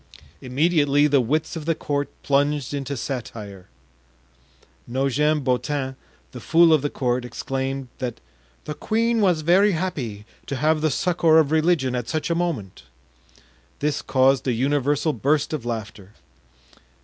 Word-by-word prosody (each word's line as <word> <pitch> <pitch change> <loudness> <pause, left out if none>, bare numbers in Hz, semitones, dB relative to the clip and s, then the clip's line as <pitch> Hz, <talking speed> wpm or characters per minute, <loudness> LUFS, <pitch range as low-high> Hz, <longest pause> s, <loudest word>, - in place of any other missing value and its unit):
Immediately 145 +1 +2
the 145 -2 +3
wits 155 +8 -1
of 160 -2 -6
the 165 0 +1
court 145 -1 -2
plunged 145 -1 +1
into 140 -1 -3
satire. 110 -7 -6 1.2
Nogent 140 +4 +1
Beautin, 130 +1 -1 0.4
the 125 - -8
fool 165 +4 +5
of 155 - +4
the 145 - -1
court, 125 -2 -1
exclaimed 135 +2 -4
that 125 -3 -4 0.5
"the 150 - -4
queen 230 +6 0
was 180 -6 +2
very 190 +6 +4
happy 135 - -4 0.2
to 140 - -3
have 155 +4 +1
the 155 - +2
succor 170 +1 +2
of 155 -2 +3
religion 155 -5 +2
at 120 -2 -3
such 160 +2 -2
a - - +4
moment." 165 - -3 1.0
This 150 0 -1
caused 135 0 +2
a 125 - +2
universal 145 +4 +1
burst 145 +6 0
of 135 -6 -4
laughter. 110 -3 -6
145 Hz, 140 wpm, -23 LUFS, 130-155 Hz, 1.2 s, fool